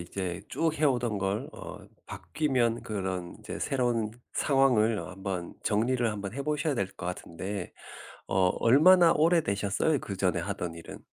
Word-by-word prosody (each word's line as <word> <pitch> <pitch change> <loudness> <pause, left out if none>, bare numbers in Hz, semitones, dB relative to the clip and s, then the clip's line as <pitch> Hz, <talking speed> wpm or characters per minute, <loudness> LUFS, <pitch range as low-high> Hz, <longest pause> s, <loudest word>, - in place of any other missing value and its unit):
이제 90 0 -4
쭉 165 -1 0
해오던 125 -8 +1
걸 95 +2 -2
어 - - -9 0.3
바뀌면 125 -7 -1
그런 95 -4 -4
인제 - - -7
새로운 120 -5 0 0.2
상황을 125 -6 +3
어 - - -6
한번 95 -2 -5
정리를 120 +3 +1
한번 100 -2 -5
해 140 - -4
보셔야 150 +1 0
될 100 -6 0
것 - - -8
같은데 90 +2 -5 0.6
어 95 -1 +3
얼마나 165 +8 +6
오래 165 +2 +4
되셨어요? 100 +7 0
그 100 -5 -6
전에 90 -2 +1
하던 85 -2 -4
일은? 85 - -10
110 Hz, 295 characters per minute, -29 LUFS, 95-135 Hz, 0.6 s, 얼마나